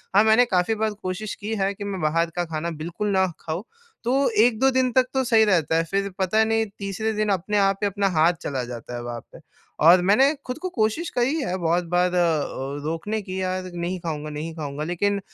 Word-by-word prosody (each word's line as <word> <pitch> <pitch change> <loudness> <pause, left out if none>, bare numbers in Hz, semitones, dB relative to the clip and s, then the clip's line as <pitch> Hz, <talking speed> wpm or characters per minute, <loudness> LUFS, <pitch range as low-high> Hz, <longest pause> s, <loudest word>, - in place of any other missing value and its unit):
हाँ 205 - +7
मैंने 220 +3 +5
काफ़ी 190 -1 +1
बार 215 0 -1
कोशिश 185 +3 -4
की 215 +2 -4
है 195 -1 0
कि 200 - -8
मैं 200 -3 -4
बाहर 165 +2 +1
का 175 0 0
खाना 155 +2 -2
बिल्कुल 175 +6 -3
ना 190 -1 +3
खाऊँ। 160 +4 -4 0.4
तो 265 +3 +2
1-2 245 +2 +3
दिन 260 -1 +2
तक 255 +1 +4
तो 265 -1 +1
सही 225 -3 +4
रहता 165 -6 +2
है 165 - +3
फ़िर 200 0 0
पता 195 +4 +3
नहीं 225 0 +1
तीसरे 200 +2 -2
दिन 215 0 0
अपने 200 +2 0
आप 195 -1 +3
पे 205 - +2
अपना 200 0 0
हाथ 160 +3 +4
चला 135 -6 -3
जाता 120 0 -7
है 120 - -5
वहाँ 120 0 -5
पे। - - -12 0.4
और 175 +3 +8
मैंने 215 +11 +4
ख़ुद 250 - -3
को 370 - -2
कोशिश 235 +4 -1
करी 250 +5 0
है 185 -8 -2
बहुत 170 0 +1
बार 180 0 +2
अ - - +1
अ, 145 -4 -1
रोकने 165 +8 -2
की 190 -1 -5
यार 185 0 -2
नहीं 175 +2 -3
खाऊँगा, 155 -3 -4
नहीं 150 +2 -5
खाऊँगा। 150 -2 -5
लेकिन 200 +5 0
190 Hz, 225 wpm, -24 LUFS, 165-220 Hz, 0.4 s, और